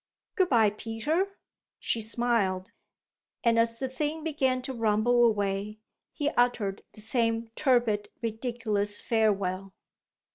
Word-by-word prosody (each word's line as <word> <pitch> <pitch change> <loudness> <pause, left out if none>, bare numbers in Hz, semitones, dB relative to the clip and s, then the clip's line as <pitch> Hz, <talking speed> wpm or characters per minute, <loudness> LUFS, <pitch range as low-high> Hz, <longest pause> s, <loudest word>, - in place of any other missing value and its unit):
"Good 375 -4 +2
bye, 225 -5 +4
Peter," 295 - -2 0.4
she 230 - -1
smiled; 220 -5 0 0.7
and 230 -1 +4
as 230 0 +2
the 265 - -2
thing 300 +4 -3
began 265 -5 0
to 265 - -4
rumble 230 +1 +3
away 205 -1 0 0.3
he 290 -1 -1
uttered 240 -7 +1
the 215 - -11
same 230 0 0
tepid, 240 -7 +2
ridiculous 220 -3 -2
farewell. 195 -4 0
230 Hz, 115 wpm, -28 LUFS, 210-255 Hz, 0.7 s, bye